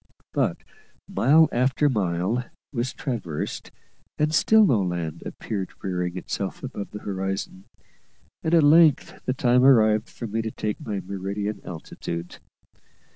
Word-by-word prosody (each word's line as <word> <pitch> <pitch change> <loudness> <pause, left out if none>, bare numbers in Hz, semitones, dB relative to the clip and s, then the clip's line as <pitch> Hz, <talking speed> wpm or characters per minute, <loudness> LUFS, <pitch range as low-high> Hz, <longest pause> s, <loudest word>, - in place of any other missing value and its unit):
But - - +1 0.5
mile 155 +5 +5
after 130 +4 +2
mile 105 0 0 0.3
was 125 0 -1
traversed, 110 - -4 0.5
and 155 0 +1
still 220 +6 +5
no 120 - +3
land 85 -4 -3
appeared 100 -4 -4
rearing 90 -1 -2
itself 90 - -4
above 100 - -5
the 105 - -8
horizon, 95 -1 -4 0.8
and 160 +1 +2
at 165 - +5
length 155 0 +4
the 130 - +1
time 125 0 +3
arrived 110 -4 +5
for 120 - -7
me 110 +1 -2
to 110 - -3
take 105 -1 -4
my 100 -3 -3
meridian 100 +2 -4
altitude. 85 0 -6
110 Hz, 130 wpm, -25 LUFS, 95-130 Hz, 0.8 s, mile